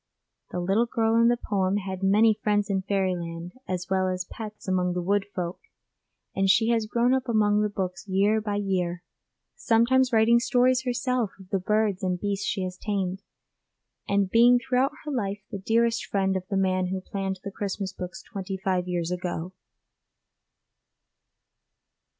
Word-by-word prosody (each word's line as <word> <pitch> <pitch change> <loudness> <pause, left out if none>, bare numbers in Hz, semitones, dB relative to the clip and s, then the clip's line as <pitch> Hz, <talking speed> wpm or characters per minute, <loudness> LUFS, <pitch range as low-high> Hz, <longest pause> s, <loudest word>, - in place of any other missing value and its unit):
The 180 - -4
little 195 +7 +2
girl 225 -2 +1
in 230 - +5
the 240 0 +3
poem 195 -3 0
had 190 -2 -5
many 210 +3 +5
friends 205 -1 +1
in 190 -1 +1
fairyland 180 -3 -2
as 180 -1 -3
well 190 0 +1
as 185 -1 -2
pets 215 0 -9
among 180 -1 +1
the 180 - -2
wood 200 +2 +1
folk, 175 -1 -3 0.8
and 195 0 +2
she 225 +3 +4
has 225 -2 +1
grown 240 +3 +2
up 265 -1 -1
among 210 -2 +3
the 210 - +1
books 190 0 -4
year 200 +3 +2
by 205 -1 -2
year, 180 -4 -1 0.5
sometimes 255 - +3
writing 230 +1 +5
stories 255 +1 +2
herself 250 -2 0
of 190 -1 -14
the 195 - +1
birds 210 0 +1
and 180 -2 -1
beasts 200 0 -2
she 195 -3 -1
has 185 0 -5
tamed, 195 -2 -2 0.9
and 200 -1 +1
being 240 +2 +6
throughout 255 +3 +1
her 300 - -3
life 205 -6 -2
the 200 - -4
dearest 230 +3 +1
friend 195 -1 0
of 185 -1 -3
the 195 - 0
man 185 -1 +1
who 190 +1 -2
planned 190 0 -4
the 200 - -5
Christmas 195 -1 -4
books 180 0 -7
twenty 195 -2 -5
five 185 -2 -1
years 175 -1 -2
ago. 180 0 -4
195 Hz, 170 wpm, -26 LUFS, 185-225 Hz, 0.9 s, being